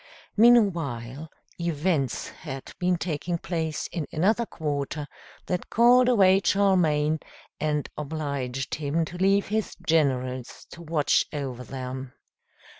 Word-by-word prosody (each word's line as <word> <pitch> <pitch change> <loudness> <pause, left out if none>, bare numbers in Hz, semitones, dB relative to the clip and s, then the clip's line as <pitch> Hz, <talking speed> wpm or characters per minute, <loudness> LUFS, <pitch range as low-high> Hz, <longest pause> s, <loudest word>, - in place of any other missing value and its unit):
Meanwhile 160 - +3 0.3
events 160 -5 -1
had 135 0 -8
been 180 0 +2
taking 170 +1 -2
place 160 -3 -3
in 165 -5 -3
another 215 +8 +1
quarter, 150 -3 -3 0.4
that 180 -1 -3
called 245 +2 +5
away 195 -5 +5
Charlemagne, 160 -6 +3 0.4
and 150 -1 0
obliged 140 -4 -3
him 155 +2 0
to 175 - -8
leave 195 +2 +3
his 220 0 -1
generals 130 -6 0
to 170 - -10
watch 155 -3 +2
over 135 -4 -4
them. 130 +1 -6
155 Hz, 115 wpm, -26 LUFS, 140-185 Hz, 0.4 s, called